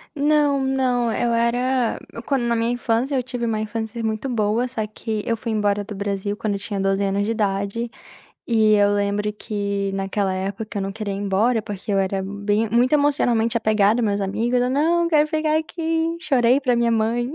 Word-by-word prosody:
Não, 290 -1 +2
não, 255 -3 +1
eu 235 +1 0
era 245 +1 +1 0.3
quando 270 -4 +1
na 235 0 +1
minha 230 +1 0
infância, 245 +3 0
eu 255 - +1
tive 245 -1 -4
uma 220 -1 -1
infância 220 +1 -4
muito 220 +4 -2
boa, 230 +1 0
só 220 -4 -3
que 215 0 -4
eu 230 -1 0
fui 230 0 -3
embora 205 -1 +1
do 210 - -8
Brasil 200 0 -3
quando 205 -2 -2
tinha 200 0 -4
12 195 +1 +1
anos 200 +1 0
de 220 - -1
idade 210 +2 -1 0.6
e 220 -2 +4
eu 205 -1 +4
lembro 205 +1 0
que 200 -2 -3
naquela 195 0 -1
época 200 +2 -4
eu - - -2
não 195 - -3
queria 205 -1 -4
ir 195 - -4
embora, 205 +4 +1
porque 205 -1 -5
eu 195 - +3
era 190 0 -1
bem 205 +2 -1
muito 245 +4 +3
emocionalmente 245 -6 +2
apegada 215 0 +3
aos - - +1
meus 200 -1 0
amigos. 235 +6 0
"Não, 330 +5 +2
eu 335 - 0
quero 305 -1 +4
ficar 310 0 +1
aqui". 325 +1 -2
Chorei 265 -5 +3
pra 255 -3 +1
minha 235 0 +2
mãe. 230 +3 0
225 Hz, 195 wpm, -22 LUFS, 205-250 Hz, 0.6 s, e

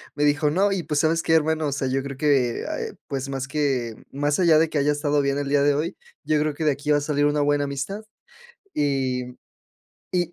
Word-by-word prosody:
me 145 - 0
dijo: 145 +1 +3
"No, 195 +6 +2
y, 190 -3 -1
pues, 150 -1 0
¿sabes 165 +1 +2
qué, 160 - +1
hermano?, 160 -1 +2
o - - -2
sea, 135 -1 -2
yo 135 +1 0
creo 140 -1 -6
que, 135 -5 +2
eh, - - -4
pues, 135 0 -3
más 135 -1 -3
que 130 -6 -1 0.2
más 145 +3 0
allá 170 -3 +5
de 160 0 +2
que 155 - -2
haya 145 +1 +2
estado 145 0 +1
bien 140 0 0
el 145 -1 -2
día 145 0 +3
de 145 0 +4
hoy, 160 +5 -2 0.3
yo 155 -1 +1
creo 150 0 0
que 160 - -5
de 150 - +4
aquí 140 +2 -5
va 145 0 +3
salir 145 0 +1
una 145 0 +2
buena 145 0 +2
amistad", 145 +9 -4 0.7
y 130 -3 0 0.9
y 175 -2 +1
145 Hz, 230 wpm, -24 LUFS, 140-155 Hz, 0.9 s, allá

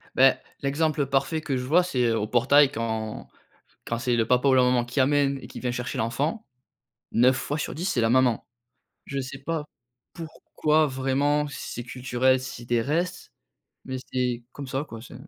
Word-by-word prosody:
Beh, 135 +1 +6 0.3
l'exemple 145 +1 0
parfait 140 +4 0
que 145 -3 -2
je 125 - -3
vois 160 +8 +4
c'est, 130 -9 0
heu, 115 -1 +2
au 105 - -2
portail 135 +4 +5
quand 110 -1 -4 0.6
quand 115 - -2
c'est 120 0 +1
le 115 -1 +1
papa 125 +3 +3
ou 130 - +5
la 130 - +5
maman 125 -1 +2
qui 120 +3 -5
amène 140 0 +3
et - - -10
qui - - -9
vient 125 - -1
chercher 125 0 -4
l'enfant. 145 - -1 0.7
9 125 +3 +4
fois 145 +2 -3
sur - - -3
10 170 +4 -5
c'est 125 - +1
la 115 - +3
maman. 125 -2 +3 0.6
Je 140 -1 -3
sais 135 +1 -7
pas 160 +2 -3 0.5
pourquoi 155 -1 0
vraiment, 140 +3 +1
si 145 - -7
c'est 120 - -5
culturel, 130 +1 +1
si 130 -2 -7
c'est - - -10
des 120 -1 +1
restes, 170 +7 -2 0.5
mais 130 0 -4 0.2
c'est 125 -2 -1
comme 140 - -7
ça 135 +3 -2
quoi, 115 -6 -10
c'est 125 - -12
130 Hz, 195 wpm, -26 LUFS, 120-145 Hz, 0.7 s, Beh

